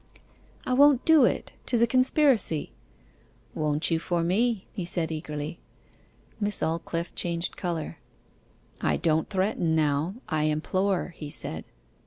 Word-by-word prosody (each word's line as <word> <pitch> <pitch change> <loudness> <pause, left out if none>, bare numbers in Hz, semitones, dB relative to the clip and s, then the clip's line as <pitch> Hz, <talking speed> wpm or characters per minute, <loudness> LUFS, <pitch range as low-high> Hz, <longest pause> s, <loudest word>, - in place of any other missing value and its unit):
'I 255 - 0
won't 280 -1 +5
do 315 -5 +7
it - - -1
'tis 235 -2 +3
a - - +7
conspiracy.' 255 - +2 0.8
'Won't 150 +2 0
you 165 - +2
for 170 0 -1
me?' 210 +4 +1
he 190 - -4
said 170 -2 -1
eagerly. 155 +1 -5 0.8
Miss 205 -1 0
Aldclyffe 165 +1 -2
changed 170 0 -2
colour. 165 - -4 0.8
'I - - +1
don't 160 -1 +1
threaten 185 -4 0
now, 155 +4 +1
I 155 -2 0
implore,' 185 +5 0
he 150 - -7
said. 80 - -4
170 Hz, 130 wpm, -27 LUFS, 155-215 Hz, 0.8 s, do